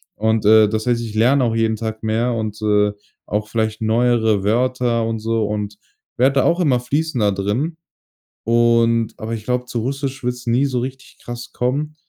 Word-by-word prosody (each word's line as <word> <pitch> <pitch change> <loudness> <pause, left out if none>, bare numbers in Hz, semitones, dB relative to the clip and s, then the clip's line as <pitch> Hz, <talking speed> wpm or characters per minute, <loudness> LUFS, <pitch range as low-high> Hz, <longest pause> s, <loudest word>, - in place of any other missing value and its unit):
Und, 110 0 0
äh, 110 0 +6
das 110 +2 -2
heißt, 120 -1 +1
ich 110 -2 -6
lerne 125 +5 +3
auch 115 -1 0
jeden 115 -1 +1
Tag 110 0 -5
mehr 115 +3 0
und, 110 -1 -4
äh, 105 -1 +2 0.3
auch 105 +1 -2
vielleicht 110 -1 -2
neuere 110 -2 +2
Wörter 120 +1 +1
und 115 -1 -2
so, 110 0 0
und 105 0 -4 0.4
werde 135 +3 +3
da - - +1
auch 170 +1 +2
immer 140 -8 +2
fließender 125 -4 0
drin. 110 - -2 0.7
Und 115 0 +3
aber 110 +1 -5
ich 105 -1 -9
glaube, 125 +1 -1
zu 125 -1 -4
Russisch 135 +1 -4
wird's 125 0 -4
nie 120 +4 +2
so 130 -3 -1
richtig 130 +2 -7
krass 120 0 -7
kommen, 145 +5 -2
115 Hz, 185 wpm, -20 LUFS, 110-125 Hz, 0.7 s, äh